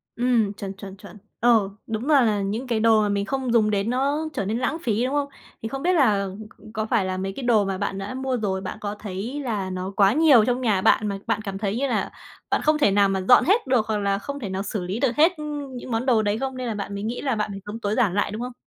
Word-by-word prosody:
Ừm, 235 -4 +1
chuẩn, 195 -1 -6
chuẩn, 195 0 -10
chuẩn. 205 0 -13 0.2
Ờ, 225 -4 +4 0.2
đúng 225 +3 -3
là 285 -3 +6
là 210 -3 +2
những 215 +6 -3
cái 230 -3 0
đồ 220 -1 +4
mà 210 - +1
mình 200 0 0
không 260 -1 -2
dùng 215 -2 +4
đến 200 +2 0
nó 280 +5 0
trở 195 - -2
nên 215 +3 -1
lãng 310 +5 -1
phí, 230 +1 0
đúng 265 - -2
không? 285 -1 0 0.3
Thì 225 - -4
không 270 +1 -5
biết 360 +2 +3
là 210 - +3 0.2
c 215 +1 -16
có 215 0 -2
phải 220 -4 +1
là 185 0 -2
mấy 195 +1 -3
cái 265 - -7
đồ 225 -4 +3
mà 195 -1 -2
bạn 200 0 -3
đã 195 +5 -5
mua 260 -1 -2
rồi, 190 -3 -2
bạn 185 - -6
có 205 0 -4
thấy 210 +8 -5
là 210 -7 -2
nó 185 +1 -4
quá 200 +1 +4
nhiều 285 -8 +6
trong 250 +1 0
nhà 210 -6 +1
bạn 210 - +3
mà 200 -1 -2
bạn 225 -1 0
cảm 195 -2 -5
thấy 205 +2 -2
như 275 +1 0
là - - -1 0.4
bạn - - +1
không 305 0 +3
thể 205 -9 +3
nào 200 0 +4
mà 190 -1 -1
dọn 250 - +8
hết 400 - +2
được 245 -4 +2
hoặc 215 - 0
là 200 -1 0
không 280 +6 -6
thể 210 -7 -5
nào 190 +1 -3
xử 205 -2 -3
lý 190 +6 -3
được 250 -3 +1
hết, 325 +4 +6
ư, 300 - -6 0.3
những 245 0 -7
món 225 +3 -1
đồ 235 -4 +3
đấy 205 0 0
không, 265 0 -3
nên 255 -1 -4
là 225 - -2
bạn 200 0 -5
mới 200 0 -5
nghĩ 230 +3 -3
là 265 -4 0
bạn 210 -1 -2
phải 195 - -6
sống 210 +2 -6
tối 210 -1 -1
giản 200 -7 +2
lại, 205 - 0
đúng 220 +2 -5
không? 250 0 -5
215 Hz, 295 wpm, -24 LUFS, 200-250 Hz, 0.4 s, dọn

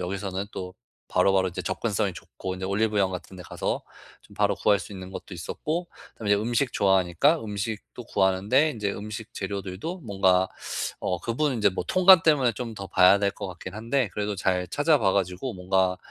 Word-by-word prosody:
여기서는 95 +1 -3
또 90 0 -6 0.3
바로바로 95 0 +3
이제 90 - -5
접근성이 - - -1
좋고, 95 -1 -7
이제 95 - -5
올리브영 100 0 +1
같은 95 +1 -7
데 90 - -9
가서 - - -3 0.4
좀 - - -18
바로 - - +2
구할 100 - +3
수 - - -9
있는 95 -1 -8
것도 95 - -8
있었고, 155 - -4 0.3
그다음에 105 -2 -3
이제 105 - +3
음식 120 +3 0
좋아하니까 95 - +3
음식도 110 +2 -5
구하는데 100 +10 +2
인제 105 -4 -2
음식 110 +2 -7
재료들도 100 - -5
뭔가 95 -5 +2 0.5
어 90 -1 -1
그 115 - -3
부분은 140 -3 0
이제 105 - +5
뭐 95 - -4
통관 185 -2 +7
때문에 140 -7 +4
좀 115 +1 -6
더 100 -2 -7
봐야 95 +2 +6
될 100 0 +1
것 100 - -6
같긴 90 +1 -8
한데, 115 +2 0
그래도 105 0 -2
잘 90 -1 0
찾아봐 145 - +3
가지고 95 +5 -1
뭔가 95 0 +1
100 Hz, 395 characters per minute, -26 LUFS, 95-115 Hz, 0.5 s, 통관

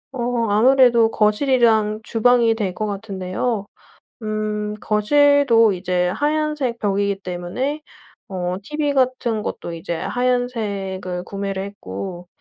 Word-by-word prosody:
어 240 -2 -1
아무래도 235 +1 +5
거실이랑 220 -1 +2
주방이 235 0 +3
될 200 -5 -2
것 215 - -2
같은데요. 200 +1 -3 0.6
음 215 -1 -2
거실도 235 0 +4
이제 180 -1 0
하얀색 295 +1 -1
벽이기 200 -1 0
때문에 185 +13 -3 0.5
어 180 -1 -3
티브이 295 +4 -2
같은 250 -4 0
것도 170 - -5
이제 165 +1 -4
하얀색을 205 -8 -2
구매를 195 0 -4
했고 175 - -7
215 Hz, 250 characters per minute, -21 LUFS, 195-245 Hz, 0.6 s, 아무래도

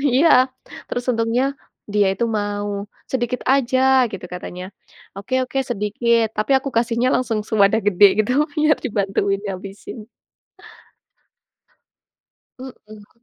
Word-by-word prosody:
Iya. 315 +5 +5 0.6
Terus 245 0 -3
untungnya 230 +2 0 0.5
dia 205 -2 +3
itu 235 - -1
mau, 205 0 -3 0.3
"Sedikit 250 -1 -2
aja." 265 -1 +3
Gitu 190 -2 -7
katanya. 180 0 -7 0.5
"Oke 255 +6 -1
oke, 270 +1 -3
sedikit." 230 +1 +1
Tapi 215 +6 -1
aku 275 +1 -4
kasihnya 235 +2 +1
langsung 230 -4 -1
sewadah 215 0 +3
gede 205 +1 +6 0.2
gitu 250 - -1 0.2
biar 305 0 +3
dibantuin 195 -2 0
ngabisin. 195 +4 -7 2.6
Mhm. 215 -3 -13
230 Hz, 110 wpm, -20 LUFS, 205-255 Hz, 2.6 s, gede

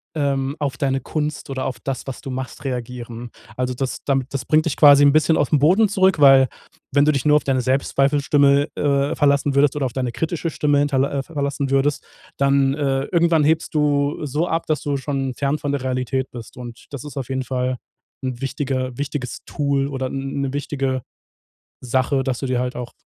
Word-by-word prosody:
ähm, 140 -2 -1
auf 140 -3 -2
deine 135 -2 0
Kunst 150 -2 -4
oder 130 -1 -3
auf 130 - -3
das, 135 -2 -4
was 135 - -5
du 135 - -7
machst 130 +2 -6
reagieren. 120 -2 -5 0.3
Also 125 0 -1
das 130 +1 -3
damit 135 -2 0
das 130 -2 -3
bringt 155 +3 +3
dich 165 - -1
quasi 145 -1 +8
'n 140 - +5
bisschen 155 +1 +3
auf - - 0
'n 150 - +5
Boden 185 +9 +4
zurück, 190 -4 +2
weil, 135 -3 +7 0.4
wenn 145 0 +4
du 150 - +3
dich 140 - -1
nur 150 0 +6
auf - - -2
deine 130 -2 +1
Selbstzweifelstimme, 140 +2 +2
äh, 140 -1 +1
verlassen 140 -1 +2
würdest 140 0 +3
oder 140 - 0
auf 125 - -4
deine 125 -2 -2
kritische 165 +4 -2
Stimme 145 -2 +1
hinter 145 -2 +1
äh, 140 -1 -2
verlassen 140 -2 -3
würdest, 135 +1 +1 0.3
dann, 140 -1 +3
äh, 135 -2 0
irgendwann 170 -2 +3
hebst 160 +2 +1
du 145 0 +1
so 150 +5 -1
ab, 165 -1 -1
dass 155 -3 0
du 145 -1 -1
schon 135 -1 -3
fern 140 +3 -1
von 145 - -2
der 140 -2 -2
Realität 130 0 -2
bist. 120 -1 -10
Und 120 -2 -10
das 140 -1 -7
ist 150 - -9
auf 130 -3 -4
jeden 130 0 -2
Fall 130 0 -2 0.5
'n 130 -1 -4
wichtiger 130 -2 -3
wichtiges 140 -3 -4
Tool 140 -1 0
oder 130 -2 -3
'n 135 +1 -4
'ne 135 -1 -2
wichtige 135 -3 -2 0.8
Sache, 130 +2 +1
dass 130 -2 -1
du 135 - -2
dir 125 -1 0
halt 125 0 -2
auch, 120 -1 -6
140 Hz, 205 wpm, -21 LUFS, 130-145 Hz, 0.8 s, quasi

